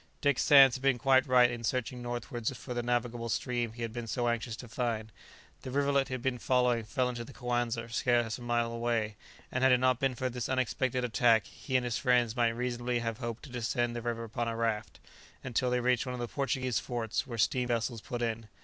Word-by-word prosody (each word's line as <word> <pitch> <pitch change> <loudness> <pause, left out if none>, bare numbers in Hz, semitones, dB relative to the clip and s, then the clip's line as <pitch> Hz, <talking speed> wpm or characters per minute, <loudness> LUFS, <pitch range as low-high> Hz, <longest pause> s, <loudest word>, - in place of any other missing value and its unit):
Dick 145 -2 +2
Sands 135 -4 +7
had - - -14
been 135 -2 +3
quite 130 +1 +4
right 125 -1 +5
in 120 -1 -6
searching 125 +1 -2
northwards 120 -1 -3
for 125 - -6
the 120 - -1
navigable 120 -1 -1
stream 120 -1 -1
he 120 0 -6
had 115 -1 -4
been 120 -1 -5
so 120 +1 -1
anxious 120 -1 -1
to 125 - -10
find; 115 -3 -2 0.5
the - - -7
rivulet 140 0 +2
he 130 - -3
had 125 - -7
been 130 -2 -1
following 125 -2 +2
fell 125 +3 0
into 120 -1 -4
the 135 - -12
Coanza 120 -2 -2
scarce 120 0 +1
a - - -12
mile 120 -1 0
away, 115 -2 -1 0.4
and 125 - -1
had 130 - +6
it 125 - +6
not 130 0 +2
been 135 -2 +1
for 130 +2 -1
this 125 -1 -4
unexpected 130 0 0
attack 115 -2 +3
he 130 - -6
and 125 -1 +3
his 120 -1 -1
friends 125 -3 +2
might 120 -2 +3
reasonably 120 +1 -2
have 115 -2 -3
hoped 115 0 -5
to 140 - -10
descend 120 0 -1
the 120 - -3
river 115 0 -3
upon 115 +1 -3
a 115 - -2
raft, 115 -2 -2 0.4
until 125 0 0
they 125 0 +1
reached 125 +1 +1
one 125 - -3
of - - -7
the 120 - -2
Portuguese 130 -2 -1
forts 115 0 -3
where 120 -3 -5
steam 125 +3 +1
vessels 115 -1 -1
put 120 -1 -4
in. 115 -1 -2
120 Hz, 230 wpm, -31 LUFS, 115-125 Hz, 0.5 s, Sands